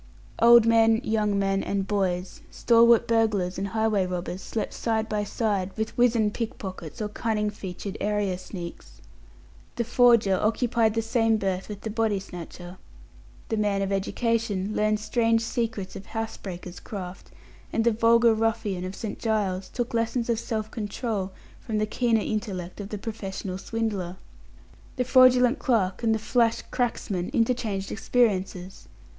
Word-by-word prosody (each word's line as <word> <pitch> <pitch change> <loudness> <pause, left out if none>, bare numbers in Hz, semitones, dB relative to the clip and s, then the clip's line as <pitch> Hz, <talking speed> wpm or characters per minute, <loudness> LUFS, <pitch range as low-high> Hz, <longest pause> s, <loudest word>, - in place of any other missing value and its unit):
Old 235 0 +8
men, 225 -1 +5
young 215 -4 +1
men, 195 0 +1
and 195 -1 -1
boys, 185 -3 -1
stalwart 235 0 +4
burglars 210 -6 +1
and 195 - -2
highway 220 -1 +1
robbers, 180 +1 -4
slept 220 - -4
side 220 -1 -1
by 210 -1 -1
side 205 -3 -1
with 220 0 -3
wizened 230 -4 +3
pickpockets 190 - -6
or - - -1
cunning 210 0 -1
featured 195 0 -6
area 205 -2 0
sneaks. 175 -3 -9 0.8
The 235 - 0
forger 235 -5 +4
occupied 225 0 +1
the 225 - 0
same 225 -1 +2
berth 190 -2 -2
with 205 -1 -7
the 220 - -4
body 220 -2 +1
snatcher. 175 0 -9 0.7
The 220 - 0
man 205 -2 +1
of 195 - -2
education 210 0 -1
learned 215 0 +2
strange 225 +1 +1
secrets 225 -4 -3
of 195 - -9
house 225 0 -4
breakers' 180 -2 -8
craft, 185 -3 -8 0.4
and 225 - +1
the 235 - +4
vulgar 230 +1 +4
ruffian 220 -4 -1
of 185 +1 -5
St. 220 - -5
Giles 195 -4 -1
took 240 -1 -3
lessons 230 +1 0
of 225 - 0
self 220 -2 -3
control 210 -3 -3 0.3
from 220 -3 -3
the 215 - +1
keener 225 0 +1
intellect 200 -4 -4
of 200 - -7
the 210 - -4
professional 195 -3 -5
swindler. 200 -5 -3 0.8
The 255 - 0
fraudulent 255 0 +5
clerk 200 -8 +1
and 225 -2 +2
the - - +1
flash 230 +1 +1
"cracksman" 215 -7 -1
interchanged 230 -5 0
experiences. 195 -5 -1
215 Hz, 150 wpm, -26 LUFS, 195-230 Hz, 0.8 s, Old